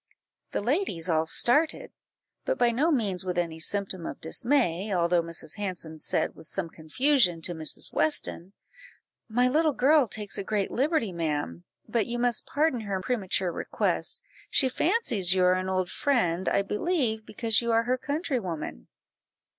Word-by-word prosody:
The -, -, -2 dB
ladies 230 Hz, -, -1 dB
all 160 Hz, 0 st, +1 dB
started, 295 Hz, -, +2 dB, 0.5 s
but -, -, -1 dB
by 240 Hz, -, +3 dB
no 280 Hz, +8 st, +1 dB
means 205 Hz, -, +1 dB
with 180 Hz, -1 st, -3 dB
any 165 Hz, -2 st, -2 dB
symptom 190 Hz, 0 st, -1 dB
of -, -, -7 dB
dismay, 210 Hz, -, 0 dB
although 175 Hz, -1 st, +2 dB
Mrs. 165 Hz, 0 st, -4 dB
Hanson 175 Hz, -6 st, -4 dB
said, -, -, 0 dB
with -, -, -15 dB
some 180 Hz, -2 st, -2 dB
confusion, 180 Hz, -, +2 dB
to 175 Hz, -, 0 dB
Mrs. 160 Hz, -2 st, 0 dB
Weston 165 Hz, +4 st, 0 dB, 0.8 s
"My 245 Hz, +3 st, +3 dB
little 305 Hz, +3 st, +2 dB
girl 280 Hz, +1 st, +4 dB
takes 210 Hz, -1 st, -5 dB
a -, -, -2 dB
great 205 Hz, 0 st, -1 dB
liberty, 270 Hz, -, +1 dB
ma'am, 145 Hz, -, -3 dB, 0.2 s
but 230 Hz, -4 st, 0 dB
you 240 Hz, 0 st, -3 dB
must 240 Hz, -1 st, 0 dB
pardon 295 Hz, -3 st, +1 dB
her 200 Hz, -3 st, -3 dB
premature 190 Hz, -4 st, -1 dB
request; -, -, -1 dB, 0.3 s
she 265 Hz, -, +2 dB
fancies 245 Hz, -, +2 dB
you 185 Hz, -, +3 dB
are 180 Hz, 0 st, +5 dB
an 185 Hz, 0 st, -1 dB
old 185 Hz, -1 st, -1 dB
friend, 190 Hz, -, +1 dB
I 200 Hz, -, +2 dB
believe, 220 Hz, -, -1 dB
because 225 Hz, +1 st, +1 dB
you 235 Hz, 0 st, -1 dB
are 225 Hz, 0 st, +3 dB
her 250 Hz, +2 st, 0 dB
countrywoman." 245 Hz, -, -3 dB
205 Hz, 160 wpm, -27 LUFS, 175-250 Hz, 0.8 s, are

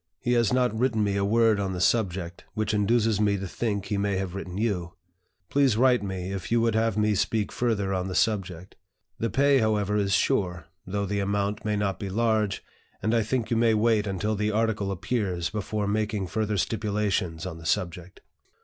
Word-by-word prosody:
He 120 Hz, -, 0 dB
has 115 Hz, -4 st, +3 dB
not 125 Hz, -3 st, +2 dB
written 115 Hz, -2 st, +1 dB
me 100 Hz, -1 st, 0 dB
a 100 Hz, -, +1 dB
word 110 Hz, 0 st, +3 dB
on 95 Hz, -1 st, -1 dB
the 90 Hz, -, -4 dB
subject, 90 Hz, -4 st, 0 dB
which 110 Hz, 0 st, -1 dB
induces 110 Hz, 0 st, +2 dB
me 100 Hz, -1 st, +2 dB
to 100 Hz, 0 st, -5 dB
think 100 Hz, 0 st, -2 dB
he 100 Hz, -2 st, -1 dB
may 100 Hz, -1 st, 0 dB
have 95 Hz, -2 st, -3 dB
written 95 Hz, -1 st, -6 dB
you. 90 Hz, -6 st, -2 dB, 0.6 s
Please 135 Hz, -6 st, +3 dB
write 125 Hz, -1 st, +4 dB
me 95 Hz, -2 st, -4 dB
if 95 Hz, 0 st, -5 dB
you 120 Hz, -, +4 dB
would 115 Hz, -1 st, +2 dB
have 110 Hz, -1 st, +1 dB
me 105 Hz, 0 st, +2 dB
speak 105 Hz, +1 st, 0 dB
further 105 Hz, -5 st, 0 dB
on 90 Hz, 0 st, -1 dB
the 95 Hz, -, -4 dB
subject. 95 Hz, -4 st, -1 dB, 0.4 s
The 115 Hz, -, 0 dB
pay, 140 Hz, +5 st, +4 dB
however, 105 Hz, -2 st, +1 dB
is 100 Hz, -1 st, +1 dB
sure, 90 Hz, -3 st, +1 dB, 0.2 s
though 100 Hz, +2 st, -1 dB
the 100 Hz, +1 st, -2 dB
amount 100 Hz, +1 st, -1 dB
may 105 Hz, -1 st, 0 dB
not 100 Hz, -2 st, -1 dB
be 100 Hz, -, -4 dB
large, 110 Hz, -1 st, 0 dB, 0.4 s
and 110 Hz, -, +1 dB
I 115 Hz, -, +3 dB
think 115 Hz, +2 st, -2 dB
you 115 Hz, -, +2 dB
may 115 Hz, -1 st, +3 dB
wait 110 Hz, -1 st, +2 dB
until 100 Hz, +3 st, -1 dB
the 105 Hz, +1 st, 0 dB
article 110 Hz, -2 st, 0 dB
appears, 95 Hz, -3 st, -2 dB
before 105 Hz, 0 st, -2 dB
making 105 Hz, -1 st, -1 dB
further 105 Hz, +3 st, -1 dB
stipulations 105 Hz, -6 st, -1 dB
on 85 Hz, -3 st, -6 dB
the 80 Hz, -, -12 dB
subject." 90 Hz, 0 st, -2 dB
105 Hz, 200 wpm, -26 LUFS, 95-110 Hz, 0.6 s, write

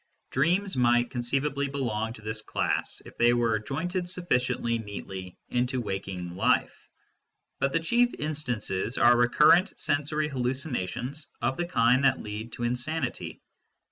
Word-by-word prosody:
Dreams 180 Hz, +8 st, +1 dB
might 120 Hz, -1 st, +3 dB
conceivably 135 Hz, +3 st, -1 dB
belong 115 Hz, -5 st, -2 dB
to 110 Hz, -, -14 dB
this 110 Hz, 0 st, -2 dB
class, -, -, -2 dB
if -, -, -12 dB
they 120 Hz, 0 st, +5 dB
were 115 Hz, -3 st, +2 dB
jointed 175 Hz, -, -3 dB
sufficiently 125 Hz, -9 st, 0 dB
neatly 95 Hz, -3 st, -7 dB
into 125 Hz, +1 st, 0 dB
waking 95 Hz, -5 st, -4 dB
life; 95 Hz, -, +1 dB, 0.7 s
but 140 Hz, 0 st, +1 dB
the 165 Hz, -, +2 dB
chief 240 Hz, +8 st, +3 dB
instances 125 Hz, -9 st, -2 dB
are 120 Hz, +1 st, +6 dB
recurrent 150 Hz, +9 st, +4 dB
sensory 150 Hz, +1 st, 0 dB
hallucinations 130 Hz, -, -3 dB
of 120 Hz, +3 st, 0 dB
the 175 Hz, +3 st, -2 dB
kind 125 Hz, -5 st, +3 dB
that 135 Hz, -1 st, +4 dB
lead 105 Hz, +2 st, -6 dB
to 120 Hz, -, -5 dB
insanity. 125 Hz, +4 st, -2 dB
125 Hz, 135 wpm, -28 LUFS, 115-150 Hz, 0.7 s, are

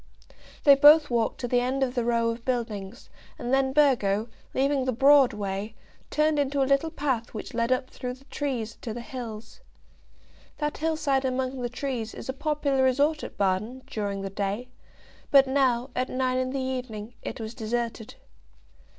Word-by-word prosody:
They 285 Hz, -, +9 dB
both 295 Hz, +1 st, +7 dB
walked 230 Hz, -2 st, 0 dB
to 245 Hz, -, -2 dB
the 245 Hz, +1 st, +2 dB
end 260 Hz, +2 st, 0 dB
of 250 Hz, -2 st, -1 dB
the 245 Hz, -2 st, 0 dB
row 230 Hz, -1 st, +1 dB
of 230 Hz, 0 st, -7 dB
buildings, 230 Hz, -3 st, -3 dB, 0.3 s
and 240 Hz, +2 st, -3 dB
then 270 Hz, 0 st, +3 dB
Burgo, 235 Hz, -7 st, +2 dB, 0.3 s
leaving 275 Hz, 0 st, +1 dB
the 260 Hz, -, +1 dB
broad 275 Hz, +2 st, +6 dB
way, 205 Hz, +1 st, -4 dB, 0.3 s
turned 305 Hz, 0 st, +2 dB
into 280 Hz, 0 st, +1 dB
a -, -, +2 dB
little 275 Hz, +4 st, +2 dB
path 265 Hz, -8 st, -2 dB
which 215 Hz, -, -6 dB
led 230 Hz, +1 st, 0 dB
up 255 Hz, 0 st, 0 dB
through 250 Hz, 0 st, -5 dB
the 270 Hz, +1 st, -21 dB
trees 250 Hz, -7 st, -3 dB
to 225 Hz, -3 st, -5 dB
the 240 Hz, -, -5 dB
hills. 235 Hz, -5 st, -8 dB, 1.0 s
That 295 Hz, -1 st, -2 dB
hillside 310 Hz, -4 st, +1 dB
among 260 Hz, 0 st, -2 dB
the 240 Hz, -, -2 dB
trees 250 Hz, -3 st, -4 dB
is -, -, -8 dB
a 265 Hz, -, -2 dB
popular 285 Hz, -1 st, 0 dB
resort 285 Hz, +4 st, +2 dB
at -, -, -8 dB
Baden, 210 Hz, +7 st, -1 dB
during 200 Hz, -2 st, -3 dB
the 195 Hz, -, -4 dB
day; 205 Hz, +5 st, -3 dB, 0.6 s
but 275 Hz, -1 st, +7 dB
now, 260 Hz, -2 st, +1 dB
at 255 Hz, +1 st, -1 dB
nine 255 Hz, 0 st, 0 dB
in 255 Hz, 0 st, -1 dB
the 270 Hz, +1 st, -2 dB
evening, 250 Hz, -4 st, -4 dB
it -, -, -6 dB
was 220 Hz, 0 st, -5 dB
deserted. 230 Hz, -1 st, -3 dB
255 Hz, 175 wpm, -26 LUFS, 230-275 Hz, 1.0 s, They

